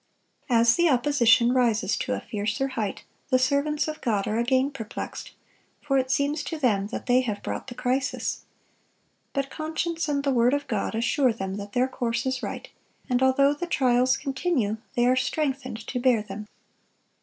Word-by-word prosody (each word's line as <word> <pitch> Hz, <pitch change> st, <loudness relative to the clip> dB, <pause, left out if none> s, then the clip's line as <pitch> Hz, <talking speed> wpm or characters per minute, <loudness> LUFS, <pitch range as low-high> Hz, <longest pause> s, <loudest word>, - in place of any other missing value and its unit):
As 230 Hz, -1 st, +4 dB
the 345 Hz, -1 st, +4 dB
opposition 245 Hz, -3 st, +4 dB
rises 225 Hz, -6 st, +2 dB
to -, -, -2 dB
a 100 Hz, -, -2 dB
fiercer 210 Hz, +6 st, -2 dB
height, 215 Hz, -6 st, -3 dB, 0.3 s
the 255 Hz, -, +4 dB
servants 280 Hz, +4 st, +1 dB
of 310 Hz, 0 st, -5 dB
God 210 Hz, -4 st, 0 dB
are 215 Hz, +2 st, 0 dB
again 260 Hz, +3 st, +2 dB
perplexed; 230 Hz, -5 st, -7 dB, 0.5 s
for 275 Hz, -2 st, +1 dB
it 260 Hz, 0 st, -2 dB
seems 285 Hz, +3 st, +1 dB
to 325 Hz, -, -4 dB
them 210 Hz, -9 st, +1 dB
that 225 Hz, -, -6 dB
they 250 Hz, +1 st, +4 dB
have 215 Hz, -5 st, -4 dB
brought -, -, -4 dB
the 245 Hz, -, -8 dB
crisis. 260 Hz, +2 st, -1 dB, 0.9 s
But 275 Hz, -1 st, -2 dB
conscience 325 Hz, +1 st, -2 dB
and 280 Hz, -1 st, 0 dB
the 275 Hz, -1 st, +1 dB
word 245 Hz, +2 st, +3 dB
of 285 Hz, 0 st, -3 dB
God 220 Hz, -4 st, -2 dB
assure 240 Hz, +3 st, +2 dB
them 195 Hz, -3 st, -4 dB
that 200 Hz, 0 st, -8 dB
their 250 Hz, +1 st, +2 dB
course 240 Hz, -2 st, -2 dB
is 260 Hz, 0 st, -1 dB
right; -, -, -5 dB, 0.4 s
and 250 Hz, +1 st, +2 dB
although 275 Hz, +2 st, +4 dB
the 345 Hz, +4 st, -5 dB
trials 255 Hz, -4 st, +3 dB
continue, 265 Hz, -, -1 dB, 0.2 s
they 240 Hz, -, +3 dB
are 250 Hz, +1 st, +4 dB
strengthened 260 Hz, -4 st, -2 dB
to 250 Hz, -, -3 dB
bear 245 Hz, -4 st, +3 dB
them. 210 Hz, +1 st, -8 dB
255 Hz, 180 wpm, -26 LUFS, 230-280 Hz, 0.9 s, As